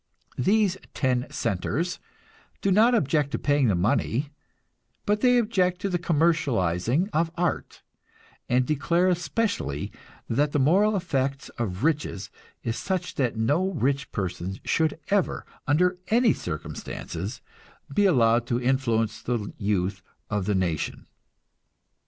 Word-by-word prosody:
These 195 Hz, -, +3 dB, 0.2 s
"Ten 125 Hz, -2 st, +1 dB
centers" 130 Hz, -, -2 dB, 0.6 s
do 195 Hz, -, +1 dB
not 225 Hz, +5 st, +5 dB
object 150 Hz, -, +1 dB
to -, -, +1 dB
paying 145 Hz, -3 st, +2 dB
the 100 Hz, -, +2 dB
money, 115 Hz, -, 0 dB, 0.8 s
but 210 Hz, 0 st, +1 dB
they 250 Hz, -1 st, +5 dB
object 185 Hz, -6 st, +1 dB
to 200 Hz, -, -1 dB
the 175 Hz, -2 st, 0 dB
commercializing 150 Hz, -, +1 dB
of 165 Hz, +1 st, +2 dB
art, 175 Hz, 0 st, -2 dB, 0.7 s
and 125 Hz, +1 st, +3 dB
declare 170 Hz, +6 st, +2 dB
especially 180 Hz, -, -1 dB, 0.4 s
that 145 Hz, +5 st, +1 dB
the 145 Hz, -, +2 dB
moral 195 Hz, +10 st, +4 dB
effect 135 Hz, -7 st, -1 dB
of 100 Hz, -2 st, -3 dB
riches 150 Hz, -10 st, -1 dB, 0.3 s
is 115 Hz, +1 st, -2 dB
such 185 Hz, -2 st, -2 dB
that 125 Hz, -4 st, -1 dB
no 145 Hz, +12 st, +2 dB
rich 140 Hz, -1 st, 0 dB
person 95 Hz, -1 st, -3 dB
should 160 Hz, -1 st, +1 dB
ever, 200 Hz, -2 st, +1 dB, 0.2 s
under 180 Hz, +5 st, +2 dB
any 230 Hz, 0 st, +4 dB
circumstances, 85 Hz, -, -6 dB, 0.5 s
be 205 Hz, -, +3 dB
allowed 120 Hz, -7 st, +3 dB
to 120 Hz, -, 0 dB
influence 120 Hz, -4 st, 0 dB
the 115 Hz, -4 st, -3 dB
youth 100 Hz, -1 st, 0 dB, 0.3 s
of 105 Hz, -3 st, 0 dB
the 105 Hz, -, +2 dB
nation. 90 Hz, -5 st, -2 dB
140 Hz, 130 wpm, -26 LUFS, 115-180 Hz, 0.8 s, not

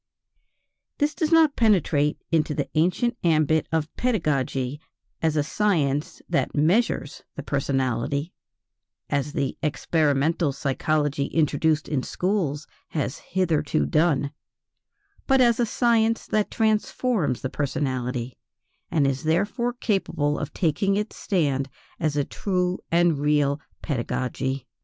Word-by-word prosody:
This 295 Hz, +1 st, +1 dB
does 315 Hz, -2 st, -1 dB
not 320 Hz, -3 st, +5 dB
penetrate 165 Hz, -9 st, +2 dB
into 155 Hz, -2 st, +1 dB
the 140 Hz, -2 st, -1 dB
ancient 180 Hz, +9 st, +1 dB
ambit 155 Hz, -2 st, +2 dB
of 160 Hz, -1 st, -1 dB
pedagogy 145 Hz, -, -1 dB, 0.4 s
as 160 Hz, -1 st, +1 dB
a 150 Hz, -, +3 dB
science 150 Hz, -6 st, 0 dB
that 170 Hz, -, 0 dB
measures 160 Hz, +1 st, +1 dB
the 145 Hz, -, -6 dB
personality, 135 Hz, +2 st, -1 dB, 0.8 s
as 145 Hz, +1 st, -1 dB
the 140 Hz, -2 st, -2 dB
experimental 155 Hz, 0 st, +1 dB
psychology 145 Hz, +1 st, 0 dB
introduced 155 Hz, 0 st, +1 dB
in 145 Hz, -4 st, 0 dB
schools 170 Hz, -4 st, -1 dB, 0.2 s
has 145 Hz, -3 st, -3 dB
hitherto 160 Hz, -5 st, 0 dB
done, 150 Hz, -4 st, +2 dB, 1.0 s
but 270 Hz, -1 st, +4 dB
as 240 Hz, -2 st, +4 dB
a 240 Hz, -, +2 dB
science 230 Hz, -1 st, +2 dB
that 215 Hz, -1 st, 0 dB
transforms 215 Hz, -, 0 dB
the 130 Hz, -, -2 dB
personality, 130 Hz, -3 st, -2 dB, 0.5 s
and 150 Hz, -4 st, +2 dB
is 135 Hz, -1 st, 0 dB
therefore 205 Hz, +10 st, +1 dB
capable 190 Hz, -11 st, -1 dB
of 150 Hz, -, -4 dB
taking 195 Hz, +4 st, +1 dB
its 210 Hz, +1 st, -2 dB
stand 140 Hz, -8 st, 0 dB, 0.3 s
as 155 Hz, -3 st, 0 dB
a 145 Hz, -, +1 dB
true 180 Hz, -2 st, -1 dB
and 170 Hz, -3 st, +3 dB
real 145 Hz, -1 st, +2 dB, 0.2 s
pedagogy. 130 Hz, 0 st, -2 dB
155 Hz, 120 wpm, -25 LUFS, 140-190 Hz, 1.0 s, not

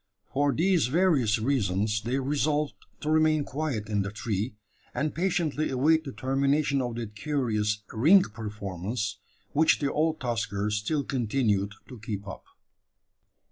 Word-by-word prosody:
For 145 Hz, +1 st, +2 dB
these 170 Hz, -2 st, +2 dB
various 140 Hz, -, +3 dB
reasons 105 Hz, -4 st, 0 dB
they 120 Hz, +4 st, -1 dB
resolved 145 Hz, +2 st, 0 dB, 0.3 s
to 150 Hz, -, -1 dB
remain 155 Hz, -1 st, +3 dB
quiet 135 Hz, -7 st, -3 dB
in 105 Hz, -2 st, 0 dB
the 100 Hz, -, -2 dB
tree, 105 Hz, +2 st, -3 dB, 0.4 s
and 150 Hz, 0 st, -1 dB
patiently 165 Hz, -4 st, 0 dB
await 155 Hz, +5 st, +3 dB
the 135 Hz, -, -5 dB
termination 140 Hz, +2 st, +1 dB
of 120 Hz, -2 st, -3 dB
that 115 Hz, -3 st, -6 dB
curious 105 Hz, -4 st, -1 dB
"ring 165 Hz, -, +6 dB
performance," 105 Hz, -, -4 dB, 0.3 s
which 160 Hz, +5 st, +4 dB
the 140 Hz, -1 st, -1 dB
old 155 Hz, +1 st, +1 dB
tusker 110 Hz, -4 st, -1 dB
still 105 Hz, +8 st, 0 dB
continued 110 Hz, -6 st, 0 dB
to 125 Hz, -3 st, -10 dB
keep 105 Hz, -1 st, -5 dB
up. 95 Hz, -, -8 dB
130 Hz, 140 wpm, -27 LUFS, 105-150 Hz, 0.4 s, ring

